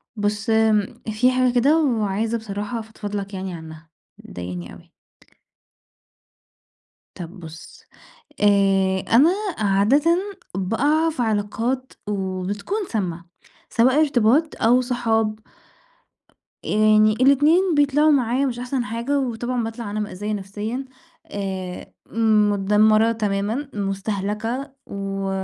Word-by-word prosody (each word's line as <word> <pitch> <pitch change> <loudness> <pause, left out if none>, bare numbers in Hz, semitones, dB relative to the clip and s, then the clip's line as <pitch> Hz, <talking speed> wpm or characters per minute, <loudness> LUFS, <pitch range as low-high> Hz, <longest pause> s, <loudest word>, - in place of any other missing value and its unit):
بُص، 210 +1 -2
آمم، 220 -2 +2
في 240 +4 +3
حاجة 255 -1 +2
كده 280 +6 +4
وعايزة 220 -2 0
بصراحة 210 +1 -5
أفضفض 215 -2 -7
لك 200 0 -4
يعني 190 -1 -5
عنها، 160 -1 -10 0.3
مضايقاني 90 0 -8
أوي. - - -17 2.2
طب 175 +2 -9
بُص، 160 -1 -12 0.6
آآ، 195 -2 +3 0.2
أنا 295 +8 +6 0.3
عادةً 220 - +3 0.4
بأقع 285 - +1
في 310 -5 -4
علاقات 225 +4 -2
وبتكون 200 - -3
سامة 175 -6 -3 0.4
سواء 255 +5 +3
ارتباط 285 +2 +2
أو 245 +3 +4
صحاب. 225 -3 0 1.3
آآ - - -5
يعني 215 0 +4
الاتنين 295 - +4
بيطلعوا 290 +1 +4
معايا 260 -1 +2
مش 245 -3 -3
أحسن 250 +1 -2
حاجة، 235 +6 -1
وطبعًا 245 -1 -2
باطلع 225 -1 -5
أنا 210 - -3
مأذية 210 0 -4
نفسيًا 210 +6 -4 0.5
آآ، 190 -2 -5 0.6
متدمرة 215 +3 +3
تمامًا، 215 +5 -2
مُستَهلكَة 210 +6 -3
و 195 0 -4
215 Hz, 105 wpm, -22 LUFS, 200-250 Hz, 2.2 s, أنا